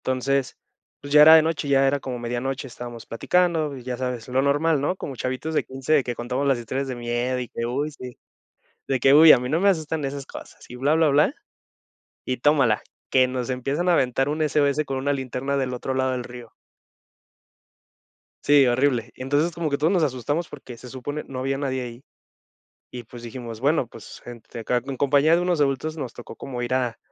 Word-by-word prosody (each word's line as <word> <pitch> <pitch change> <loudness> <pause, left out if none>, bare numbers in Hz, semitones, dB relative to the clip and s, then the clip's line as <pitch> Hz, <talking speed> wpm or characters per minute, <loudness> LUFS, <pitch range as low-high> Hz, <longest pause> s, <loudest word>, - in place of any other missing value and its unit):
Entonces, 130 +1 -1 0.4
pues 145 0 -7
ya 150 - +8
era 160 +2 +10
de 160 - +6
noche, 160 -2 -2
ya 135 -1 +4
era 140 +1 +1
como 130 -2 -5
medianoche, 125 +4 -3
estábamos 120 -2 -9
platicando 160 +2 0
y 125 - -11
ya 125 0 -4
sabes, 125 -3 -4
lo 130 +1 +1
normal, 145 +2 +2
¿no?, 145 +6 0
como 140 -7 -7
chavitos 130 +5 -3
de - - +1
15 135 +2 0
que 120 -1 -4
contamos 125 +4 -2
las 135 -2 +3
historias 130 +4 -3
de 130 - -4
miedo 120 +1 -2
y 125 - -5
que, 115 - -4
uy, 140 +5 -2
sí 125 -4 -10 0.7
de 135 - +1
que: 135 +3 +5
"Uy 155 +2 +9
a - - +9
mí 125 +1 -4
no 160 +5 +1
me 200 - +4
asustan 160 -4 0
esas 135 0 -4
cosas", - - -12
y - - -10
bla 135 +5 +1
bla 160 -1 +4
bla 150 - +3 0.9
y 130 - -2
tómala, 130 -5 +2 0.3
que 130 -1 +4
nos 125 0 -4
empiezan 135 +7 -2
a 175 - +5
aventar 135 -1 +1
un 155 +2 -1
SOS 145 0 +1
con 135 -2 -4
una 140 +2 0
linterna 135 0 -3
del 130 -2 -1
otro 125 +2 -4
lado 130 0 0
del 125 -1 -3
río. 120 -2 -11 1.9
Sí, 145 -1 +5
horrible. 125 -1 +1
Entonces 145 +6 0
como 165 -1 -2
que 140 - 0
todos 155 +6 +1
nos 180 - +2
asustamos 145 +3 -1
porque 135 -4 -10
se 125 +2 -12
supone 145 +4 -5
no 135 - -7
había 135 +1 -2
nadie 130 -2 -2
ahí 120 +1 -9 0.9
y 125 -1 -8
pues 120 +1 -12
dijimos, 115 -1 -8
bueno, 140 0 +1
pues 115 -1 -12
gente 120 -1 -10
acá 125 +2 0
en 135 -1 -4
compañía 145 +4 +3
de 175 - +1
unos 180 -2 0
adultos 145 +3 0
nos 130 -5 -5
tocó 120 - -11
como 125 -3 -6
ir 120 +1 -2
a 125 -3 -1
135 Hz, 210 wpm, -24 LUFS, 125-145 Hz, 1.9 s, era